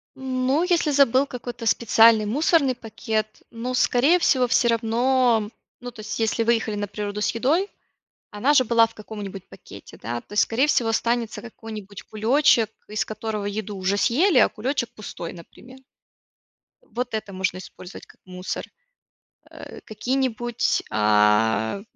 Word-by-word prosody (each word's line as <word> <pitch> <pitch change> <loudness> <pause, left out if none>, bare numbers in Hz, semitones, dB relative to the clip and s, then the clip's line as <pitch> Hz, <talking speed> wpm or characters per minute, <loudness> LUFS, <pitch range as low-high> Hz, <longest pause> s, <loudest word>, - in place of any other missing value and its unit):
Ну, 265 +4 0
если 340 -4 +1
забыл 275 0 +3
какой-то 245 -2 -7
специальный 225 -1 +4
мусорный 275 +2 +2
пакет. 220 -2 -3 0.2
Ну, 240 +2 -5
скорее 275 +8 +3
всего, 255 -6 +2
всё 240 0 +2
равно, 230 -1 +2 0.3
ну, 245 0 -7
то 220 - -16
есть 215 +2 -5
если 225 +1 0
выехали 225 -2 0
на 205 0 -3
природу 205 +1 -5
с - - +1
едой, 315 - +1 0.6
она 250 +8 +1
же 255 -3 +5
была 230 0 +4
в 225 - -18
каком-нибудь 205 -3 -8
пакете, - - -13
да? 120 +2 -4
То - - -19
есть, 210 - +4
скорее 255 +6 +1
всего, 240 -6 +1
останется 230 0 -1
какой-нибудь 215 -4 -9
кулёчек, 225 +1 +2 0.2
из 215 - -1
которого 215 -1 -5
еду 205 0 -4
уже 190 +2 0
съели, 295 - +3
а - - +6
кулёчек 250 +2 -3
пустой, 185 -5 -7
например. 245 +9 -14 1.0
Вот 245 +2 -5
это 215 -2 -4
можно 185 -1 -2
использовать 185 0 -11
как - - -22
мусор, 185 0 -5 0.9
а. - - -11
Какие-нибудь, 240 +1 -1
а, 105 - +2
225 Hz, 145 wpm, -23 LUFS, 210-255 Hz, 1.0 s, а